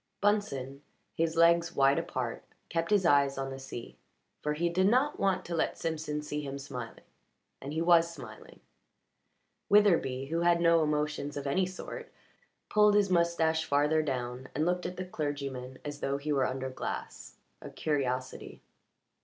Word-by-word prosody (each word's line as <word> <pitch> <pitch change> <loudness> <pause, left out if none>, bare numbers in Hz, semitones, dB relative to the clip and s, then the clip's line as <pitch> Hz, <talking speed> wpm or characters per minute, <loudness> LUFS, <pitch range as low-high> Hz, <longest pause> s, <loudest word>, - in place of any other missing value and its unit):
Bunsen, 140 -11 0 0.3
his 165 0 0
legs 170 +1 +4
wide 140 +2 +4
apart, 130 -8 -4 0.3
kept 165 0 -1
his 205 -3 +3
eyes 140 -3 +4
on 135 0 -3
the 135 - -7
sea, 125 -3 -9 0.4
for 150 - -1
he 170 +3 0
did 185 +3 +2
not 260 +7 +2
want 195 -2 +1
to 170 - -5
let 165 - 0
Simpson 155 -2 -3
see 150 0 -3
him 140 -1 -5
smiling, 125 -4 -8 0.6
and 140 - -6
he 160 +2 -1
was 170 -1 +5
smiling. 125 -10 -12 1.1
Witherbee, 165 -11 +3
who 165 +1 0
had 170 0 +4
no 170 -1 +4
emotions 150 -1 -1
of 145 - -5
any 180 +7 +1
sort, 460 - -8 0.6
pulled 210 -1 +4
his 200 -2 +3
moustache 170 -2 +2
farther 150 +1 +2
down 125 -3 -4
and 150 +3 +1
looked 180 +1 0
at 180 - -7
the 185 - -4
clergyman 140 -6 -4
as 145 0 -5
though 140 0 -1
he 150 +1 -2
were 135 -2 +2
under 130 0 -4
glass - - -6 0.3
a - - -8
curiosity. 130 -4 -3
150 Hz, 160 wpm, -30 LUFS, 135-170 Hz, 1.1 s, was